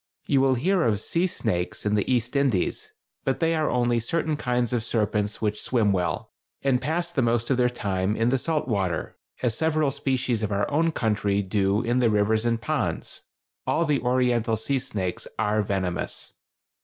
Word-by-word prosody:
You 135 - +3
will 135 -1 +3
hear 180 +9 +2
of 110 -6 +2
"sea 170 - +1
snakes" 105 - -2
in 105 - +1
the 105 +4 +1
East 125 +1 0
Indies, 135 -10 0 0.3
but 135 - 0
they 165 0 +2
are 155 -2 +1
only 120 -1 +2
certain 160 +6 -1
kinds 125 -4 0
of 120 -3 0
serpents 105 -2 -1
which 105 0 0
swim 110 -5 +2
well, 90 -4 -1 0.3
and 135 -2 +2
pass 170 +5 -1
the 145 - 0
most 120 +1 +1
of 130 - +3
their 125 -1 +3
time 100 -4 -1
in 115 +2 +2
the 130 +1 +2
salt 155 -1 -1
water, 95 -8 -1 0.3
as 120 -3 +1
several 155 -3 +1
species 130 -4 -1
of 105 -1 -2
our 100 0 +1
own 165 +3 +2
country 105 -6 0
do 100 +2 +1
in 120 +2 +1
the 120 -2 +4
rivers 110 +2 +2
and 115 -1 +1
ponds; 115 - -2 0.5
all 170 - +2
the 150 -3 +1
oriental 125 -2 +1
sea 135 +5 0
snakes 95 -7 -3
are 105 0 +1
venomous. 95 -4 -3
120 Hz, 185 wpm, -25 LUFS, 105-135 Hz, 0.5 s, the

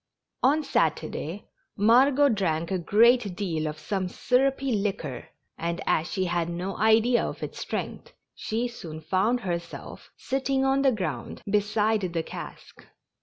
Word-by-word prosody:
On 295 +5 +3
Saturday 170 - -1 0.3
Margot 255 +7 +5
drank 170 -6 0
a 190 - 0
great 220 +2 +4
deal 165 -6 -2
of 150 0 -5
some 185 +4 -2
syrupy 270 +6 +1
liquor, 195 - -2 0.3
and, 170 +1 -2
as 160 +2 +1
she 190 -2 0
had 175 -1 -1
no 180 +3 -4
idea 225 +3 +4
of - - -5
its - - -6
strength, - - -5 0.2
she 230 +3 -2
soon 165 -10 -8
found 195 +10 +1
herself 170 -3 -6
sitting 270 0 0
on 270 +1 +2
the 270 -1 +4
ground 160 - -4
beside 210 +1 +1
the 170 -3 -2
cask. - - -10
205 Hz, 140 wpm, -26 LUFS, 170-245 Hz, 0.3 s, Margot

